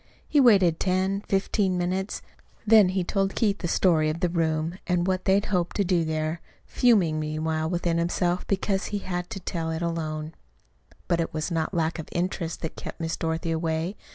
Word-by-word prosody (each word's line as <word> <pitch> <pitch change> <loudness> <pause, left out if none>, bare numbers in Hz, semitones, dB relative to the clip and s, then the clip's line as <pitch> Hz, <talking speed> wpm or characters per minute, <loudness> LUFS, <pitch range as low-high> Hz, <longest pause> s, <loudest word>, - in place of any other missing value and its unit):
He 295 - +3
waited 195 - +5
ten, 190 +1 0
fifteen 195 -1 +1
minutes; 185 +3 -2 0.4
then 215 -3 +6
he 185 0 0
told 195 +1 -1
Keith 205 -3 +1
the 175 - -2
story 165 -3 +3
of 155 +2 -3
the 180 -1 +1
room, 165 +1 -1
and 180 -2 +2
of 175 - -1
what 185 -1 -1
they 195 +1 +4
hoped 180 -4 -1
to 200 - +2
do 180 -2 +2
there, 160 +1 -2 0.2
fuming 190 -11 +3
meanwhile 155 +1 -2
within 170 -1 0
himself 175 +1 0
because 195 0 0
he 205 - -3
had 180 -2 -4
to 195 - -5
tell 165 -2 -3
it 160 +1 -3
alone. 155 -2 -3 0.7
But 170 - +1
it 165 - -4
was 155 +3 -2
not 165 +2 -1
lack 165 0 0
of 160 - -7
interest 175 -2 -2
that 160 - -5
kept - - -8
Miss 165 -1 -2
Dorothy 165 +1 -2
away. 160 +3 -1
175 Hz, 190 wpm, -26 LUFS, 160-190 Hz, 0.7 s, then